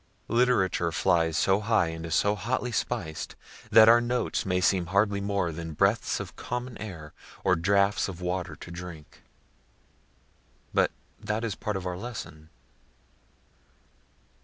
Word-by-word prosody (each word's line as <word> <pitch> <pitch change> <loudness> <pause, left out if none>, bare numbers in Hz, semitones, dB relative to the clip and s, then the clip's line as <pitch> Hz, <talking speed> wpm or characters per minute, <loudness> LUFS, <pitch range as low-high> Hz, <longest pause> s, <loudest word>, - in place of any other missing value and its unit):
Literature 115 -8 +2
flies 80 -2 +2
so 95 +3 +3
high 105 -5 +2
and 80 0 -6
is 80 - 0
so 100 - +3
hotly 120 +4 -2
spiced, 95 -9 -3 0.3
that 110 0 +8
our 120 +1 +7
notes 120 -3 -1
may 90 -1 +1
seem 90 -1 +2
hardly 100 +2 +2
more 100 -4 0
than 80 0 -6
breaths 100 +7 +2
of - - -7
common 125 0 -5
air, 85 -8 -8 0.3
or 90 - +4
draughts 100 +4 +2
of 95 -3 -7
water 90 -2 -3
to 85 - -11
drink. 85 -3 -9 1.5
But - - +3 0.3
that 110 +2 -2
is 115 -3 -1
part 105 +1 -3
of 95 - -6
our 90 -1 -3
lesson. 85 -9 -8
95 Hz, 140 wpm, -27 LUFS, 85-110 Hz, 1.5 s, that